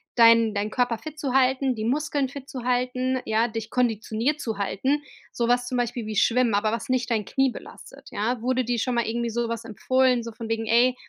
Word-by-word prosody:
deinen 230 -2 +6
deinen 205 +1 -1
Körper 245 -1 +1
fit 310 +5 -9
zu 275 -4 -2
halten, 265 0 +2
die 215 -1 -4
Muskeln 285 +2 0
fit 275 0 -9
zu 255 -5 -6
halten, 255 +1 0
ja, 220 +2 +2
dich 225 -1 -5
konditioniert 240 +4 0
zu 220 -3 -3
halten? 235 +9 0 0.3
Sowas 245 +1 +1
zum 250 - -2
Beispiel 240 -1 -2
wie 215 -1 -4
Schwimmen, 235 0 +3
aber 215 +1 +1
was 230 - -4
nicht 255 -2 0
dein 220 -2 +1
Knie 270 +4 +1
belastet, - - -12
ja? 225 +3 -1
Wurde 255 +1 0
dir 240 0 0
schon 250 +2 -1
mal 235 - +1
irgendwie 235 +1 -1
sowas 230 0 -2
empfohlen, 255 +3 +2
so 230 0 -7
von 225 0 -7
wegen: 225 0 -1
„Ey, 240 +3 +4
240 Hz, 210 wpm, -25 LUFS, 225-255 Hz, 0.3 s, deinen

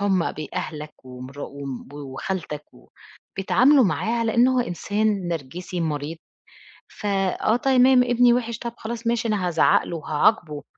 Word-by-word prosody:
هُم 190 -4 +1
بأهلك 155 -1 -6
ومرا 130 +2 -9
و 140 0 -9 0.3
وخالتك 150 +2 -5
و - - -20 0.5
بيتعاملوا 255 +7 +4
معاه 220 +4 0
على 230 -1 0
إن 245 +2 +5
هو 255 -1 +2
إنسان 205 -1 -1
نرجسي 170 +3 -5
مريض، 155 0 -3 0.7
ف - - -11
آه 195 +2 +1
تمام 255 0 +5
ابني 245 0 +4
وحِّش، 235 -2 -1
طَب 235 0 -6
خلاص 230 +1 -5
ماشي 235 0 +1
أنا 205 -5 0
هازعق 170 - +3
له 170 - -5
وهاعاقبُه، 155 0 +1
195 Hz, 145 wpm, -23 LUFS, 155-235 Hz, 0.7 s, إن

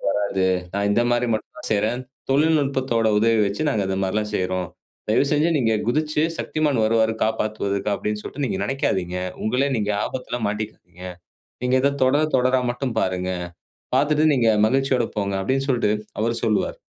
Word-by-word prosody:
வராது. 100 -2 0 0.3
நான் 100 0 +1
இந்த 115 - +3
மாரி 120 0 +2
மட்டும்தான் 155 +8 -6
செய்றேன். 110 +4 0 0.3
தொழில்நுட்பத்தோட 135 -6 +2
உதவி 115 +1 +3
வச்சு 100 +8 -2
நாங்க 110 -7 +1
இந்த 95 - -1
மாரில்லாம் 105 +3 -1
செய்றோம். 90 -1 -2 0.4
தயவுசெஞ்சு 145 +8 +2
நீங்க 115 -3 +2 0.2
குதிச்சு, 155 +3 +1
'Shaktimaan 150 -4 0
வருவாரு 110 0 +2
காப்பாத்துவதற்கு' 105 -2 -1
அப்படின்னு 105 +1 -3
சொல்லிட்டு 140 +5 -4
நீங்க 100 -4 -2
நெனைக்காதீங்க. 95 - -1 0.3
உங்களை 125 +5 +1
நீங்க 105 -1 -1
ஆபத்துல 125 -1 -4
மாட்டிக்குவீங்க. 100 -4 -6 0.6
நீங்க 125 +1 +2
இத 140 - +4
தொடர, 140 +4 +3
தொடரா 130 0 +3
மட்டும் 125 0 -3
பாருங்க. 90 0 -1 0.7
பார்த்துட்டு 150 +1 +3
நீங்க 120 -3 +3 0.2
மகிழ்ச்சியோட 130 -1 +1
போங்க." 100 -1 -1
அப்படின்னு 135 +7 0
சொல்லிட்டு 120 -5 +2 0.3
அவரு 115 +1 0
சொல்லுவாரு. 105 -2 0
115 Hz, 145 wpm, -22 LUFS, 105-135 Hz, 0.7 s, இத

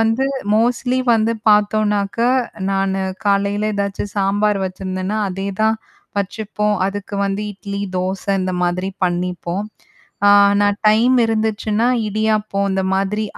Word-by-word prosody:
வந்து 225 +4 +2 0.3
மோஸ்ட்லி 245 +3 +1 0.2
வந்து 225 +1 +2 0.2
பார்த்தோம்னாக்கா, 210 +2 +2 0.4
நானு 195 0 0 0.3
காலையில 200 +1 +1
ஏதாச்சும் 200 0 -3
சாம்பார் 205 +1 +1
வச்சுருந்தேனா, 185 +2 -3
அதே 195 +2 -4 0.2
தான் 220 0 +3 0.4
வச்சுப்போம். 210 +1 -1
அதுக்கு 200 +1 -5
வந்து 200 +1 -2
இட்லி, 200 0 -6 0.2
தோசை 190 +2 -2
இந்த 185 0 -2
மாதிரி 180 +2 -1 0.2
பண்ணிப்போம். 180 +1 -2 0.6
ஆ - - +7 0.3
நான் 205 +1 +2
டைம் 235 +4 +4
இருந்துச்சுன்னா 220 0 0 0.2
இடியாப்பம் 215 -1 0
இந்தமாதிரி 190 +2 0
205 Hz, 110 wpm, -19 LUFS, 195-215 Hz, 0.6 s, ஆ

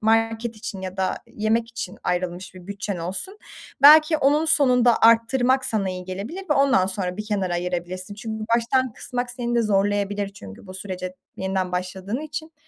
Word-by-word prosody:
market 225 +1 +1
için 205 -2 -6
ya 185 0 -6
da 190 -1 0
yemek 225 +2 0
için 230 -5 -6
ayrılmış 180 +1 -3
bir 180 -1 -12
bütçen 200 -1 -4
olsun, 195 - -5 0.4
belki 310 +2 +8
onun 295 +2 +3
sonunda 250 -6 +4
arttırmak 245 +3 +4
sana 200 -6 0
iyi 180 0 -6
gelebilir 185 +2 -5 0.3
ve - - +5
ondan 275 -10 +4
sonra 185 -2 -2
bir 215 - -4
kenara 195 -4 -1
ayırabilirsin. 180 +2 -4
Çünkü 220 +1 -5
baştan 255 +1 +1
kısmak 245 +2 -4
seni 240 -1 -3
de 235 - +3
zorlayabilir 205 0 0
çünkü 100 - -12
bu 185 - -9
sürece 185 -1 -5 0.2
yeniden 190 -1 -2
başladığın 185 +6 -3
için. 310 +1 -6
210 Hz, 165 wpm, -23 LUFS, 185-245 Hz, 0.4 s, belki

